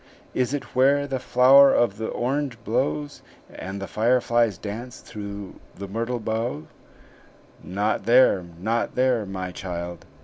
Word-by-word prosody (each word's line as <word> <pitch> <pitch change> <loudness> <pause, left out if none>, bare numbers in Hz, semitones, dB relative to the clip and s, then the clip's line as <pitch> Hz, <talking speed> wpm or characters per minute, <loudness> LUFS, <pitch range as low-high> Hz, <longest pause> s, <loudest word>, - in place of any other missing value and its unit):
Is 125 0 0
it 145 -1 -5
where 140 +2 +4
the 135 -2 -3
flower 135 +3 +6
of 110 -4 +2
the 110 - -2
orange 130 0 -2
blows, 75 -1 -2 0.3
And 95 +1 -6
the 100 - -4
fireflies 120 -2 +1
dance 115 +4 -7
through 100 -2 -8 0.2
the 100 +1 -7
myrtle 115 +4 -3
boughs?" 110 -8 -2 1.0
"Not 100 +2 -1
there, 115 -5 +5 0.2
not 115 +5 -1
there 125 -4 +1
my 95 -1 -5
child!" 85 -2 -6
115 Hz, 135 wpm, -24 LUFS, 95-125 Hz, 1.0 s, flower